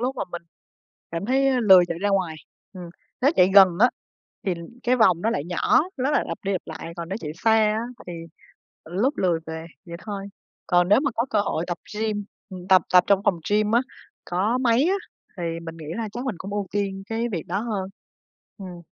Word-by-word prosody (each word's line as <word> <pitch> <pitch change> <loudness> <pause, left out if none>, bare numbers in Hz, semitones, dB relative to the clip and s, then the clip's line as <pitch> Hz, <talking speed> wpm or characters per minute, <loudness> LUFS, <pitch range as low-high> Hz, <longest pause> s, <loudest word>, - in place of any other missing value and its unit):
lúc 255 +2 -2
mà - - -2
mình 175 - -5 0.7
cảm 165 +3 -4
thấy, 270 +2 +3
a, 255 -2 +2
lười 190 -5 +7
chạy 170 - -4
ra 205 +2 0
ngoài. 185 -5 0 0.4
Ừm, 180 -3 -9 0.3
nếu 275 - +4
chạy 180 +1 +5
gần, 195 -2 +9
á, 245 - +6 0.6
thì 185 - +1 0.3
cái 250 +1 +2
vòng 180 -7 +4
nó 225 - +2
lại 150 -10 -2
nhỏ, 175 0 +2 0.2
nó 265 +3 0
lại - - +2
lặp - - -4
đi, 200 - 0
lặp 185 - -2
lại, 160 +1 -7
còn 170 -1 -6
nếu 195 - -3
chạy 150 - -5
xa, 220 +6 +2 0.2
á, - - -1 0.3
thì, 175 - -6 0.7
lúc 200 - -1
lười 175 -3 +2
về, 160 0 -6 0.2
vậy 170 0 -7
thôi. 200 -2 -5 0.4
Còn 175 -1 +3
nếu 205 - +5
mà 280 -2 0
có 235 +2 0
cơ 210 - +2
hội 175 -5 -1
tập 175 -1 -3 0.2
gym 215 -2 -1 0.3
ừm, 185 -1 -9
tập 185 -3 +6
tập 180 -1 +7
trong 200 -1 +3
phòng 175 -4 +1
gym 210 +1 +2
á, 235 - +5 0.4
có 205 +8 0
máy 250 +2 +3
á, 385 - +2 0.4
thì 175 - -4 0.2
mình 165 -1 -8
nghĩ 155 -2 -10
là 225 -2 -3
chắc 245 +2 -5
mình 245 - -1
cũng 195 +2 -7
ưu 205 -1 -2
tiên 195 -1 -2
cái 230 +1 -1
việc 165 -4 -4
đó 190 +4 -2
hơn. 210 -5 -3 0.7
Ừm. 180 -3 -9
195 Hz, 220 wpm, -24 LUFS, 175-225 Hz, 0.7 s, gần